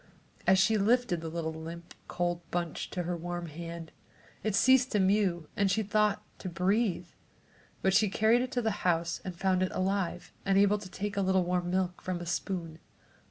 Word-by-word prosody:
As 190 - +6
she 210 +3 +3
lifted 215 -4 +2
the 165 - -4
little 160 -1 -3
limp, 165 +2 -8
cold 175 -1 -1
bunch 175 -2 -3
to 180 - -3
her 175 +1 -2
warm 175 +1 -4
hand, 165 +1 -7 0.5
it 215 -2 0
ceased 260 +4 +5
to 210 - +3
mew 190 -4 +2
and, 200 -1 +2
she 220 +3 +1
thought, 210 0 +1 0.2
to 185 - -5
breathe, 180 0 0 0.7
but 190 - +3
she 210 +1 +4
carried 220 +4 +3
it 255 +1 -3
to 245 - 0
the 220 -2 -1
house 170 -1 0
and 180 -2 -6
found 185 0 +1
it 185 - +1
alive 185 -2 -1
and 195 0 +2
able 205 +1 +4
to 195 -2 -9
take 205 +2 -4
a - - +2
little 190 -1 +2
warm 175 0 -1
milk 185 -1 -1
from 185 -2 -3
a 175 - -6
spoon. 170 -1 -3
185 Hz, 195 wpm, -30 LUFS, 175-205 Hz, 0.7 s, As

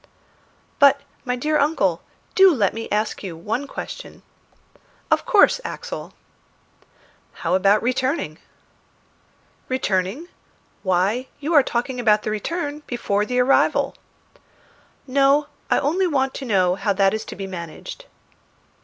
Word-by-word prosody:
"But, 280 0 +6 0.3
my 250 -1 0
dear 300 +4 0
uncle, 240 - +1 0.3
do 385 -1 +7
let 205 -6 +1
me 225 0 -6
ask 210 +1 -1
you 180 -5 -6
one 225 +11 -3
question." - - -8 0.9
"Of - - +2
course, - - +5
Axel." - - -7 1.3
"How - - +1
about 200 +3 +3
returning?" 255 - -1 1.3
"Returning? 215 - -1 0.5
Why, 195 +7 +1
you 300 +4 -2
are 295 - +8
talking 250 0 -2
about 215 -3 +3
the 215 - -2
return 295 - -3
before 210 -4 -1
the 250 0 0
arrival." 260 +2 +3 1.1
"No, 275 +2 +3 0.2
I - - +3
only 350 +7 +1
want 270 -4 0
to 270 - -6
know 185 -6 +2
how 200 +2 0
that 195 0 +3
is 220 0 -2
to - - -8
be 195 - -5
managed." 170 -4 -8
245 Hz, 125 wpm, -22 LUFS, 200-280 Hz, 1.3 s, are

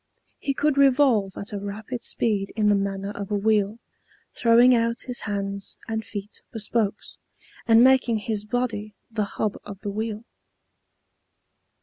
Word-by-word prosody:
He 275 - -2
could 290 -1 +1
revolve 255 -8 +4
at 200 +1 -5
a 205 - -2
rapid 215 +5 -6
speed 205 -4 0
in 210 -2 +2
the - - +5
manner 195 0 -1
of 200 -1 -6
a 210 - 0
wheel, 210 0 +1 0.6
throwing 240 +2 +6
out 230 0 +1
his 250 -2 -5
hands 200 -1 -3
and 220 0 -2
feet 205 0 -7
for - - -7
spokes, 215 -1 -1 0.5
and 230 +1 +7
making 255 -3 +4
his 210 -1 -2
body 215 -2 -3 0.2
the 215 -2 0
hub 210 -2 -1
of 200 -2 -9
the 205 - -3
wheel. 220 +1 -4
215 Hz, 150 wpm, -25 LUFS, 205-235 Hz, 0.6 s, and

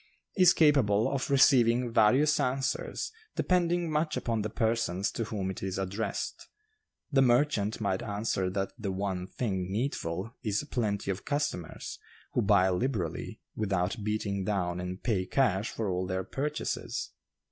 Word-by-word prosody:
is 185 -3 +7
capable 125 -9 +4
of 135 -2 -2
receiving 125 -3 +4
various 135 +9 +4
answers, 130 +1 -1 0.2
depending 175 -1 +2
much 155 0 0
upon 115 -2 -1
the 105 - -2
persons 110 -4 0
to 115 - -3
whom 100 -4 -3
it 95 - -8
is 95 -1 -3
addressed. 100 +2 -3 0.6
The 135 -2 +4
merchant 120 -4 +2
might 100 -3 0
answer 100 -3 -1
that 95 +1 -2
'the 100 -3 -2
one 95 -1 -2
thing 95 -6 -2
needful' 105 -3 -2
is 110 0 0
plenty 100 -5 0
of 95 - -5
customers, 145 - -3 0.3
who - - +2
buy 100 -2 +4
liberally, 90 - -2
without 100 0 -1
beating 100 -2 -1
down 90 -3 -1
and 90 +1 -5
pay 95 -6 0
cash 105 -5 +1
for 110 - -3
all 90 0 -1
their 95 0 -1
purchases. 145 - -3
105 Hz, 145 wpm, -30 LUFS, 95-130 Hz, 0.6 s, is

